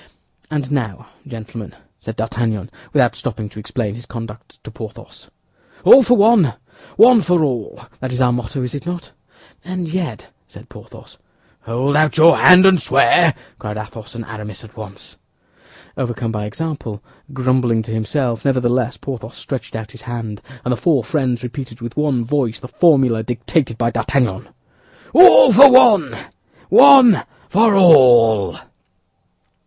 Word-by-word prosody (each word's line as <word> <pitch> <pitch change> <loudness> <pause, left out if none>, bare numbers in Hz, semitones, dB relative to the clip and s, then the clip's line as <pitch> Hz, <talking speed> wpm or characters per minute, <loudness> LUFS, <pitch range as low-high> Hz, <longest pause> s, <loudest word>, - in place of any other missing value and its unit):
"And 145 -3 -4
now, 120 -10 -4 0.2
gentlemen," 115 -4 -10 0.2
said 110 - -8
D'Artagnan, 110 -2 -4 0.2
without - - +1
stopping 105 -1 -6
to 105 - -12
explain 105 -1 -5
his 120 +2 -12
conduct 115 -2 -11
to - - -11
Porthos, - - -12 0.5
"All 270 - +7
for 245 0 +2
one, 205 - +3 0.4
one 230 +2 +6
for 175 -3 0
all—that 130 0 -6
is 125 - -4
our 125 -1 +2
motto, 125 +2 -5
is 125 - -6
it 145 +3 -8
not?" 175 -1 -7 0.5
"And 180 0 -6
yet—" 160 - -5 0.2
said - - -16
Porthos. - - -16 0.5
"Hold 130 +5 -2
out 155 +1 +1
your 165 +1 +6
hand 185 +1 +6
and 190 -4 +4
swear!" 140 +5 +2 0.2
cried 105 0 -7
Athos 110 +1 -10
and 115 -1 -7
Aramis 105 -2 -9
at 110 - -16
once. 100 -3 -12 0.8
Overcome 120 -3 -4
by 105 -2 -5
example, 115 -4 -7 0.3
grumbling 130 -4 -1
to 110 - -9
himself, 115 +2 -3
nevertheless, 125 -2 -1
Porthos 120 -4 -9
stretched 135 -4 -7
out 110 -1 -7
his 125 - -13
hand, 115 -3 -7 0.2
and 125 - -2
the 125 - -1
four 145 -5 0
friends 130 -5 -3
repeated 125 -1 -8
with 120 0 -9
one 145 -5 -1
voice 125 -4 -2
the - - -10
formula 135 -7 +2
dictated 120 +2 -3
by 115 0 -1
D'Artagnan: 115 -3 -2 0.6
"All 375 +8 +7
for 280 0 +8
one, 245 -5 +4 0.5
one 265 -7 +6 0.3
for 215 +1 +2
all." 120 - +4
125 Hz, 145 wpm, -17 LUFS, 115-155 Hz, 0.8 s, for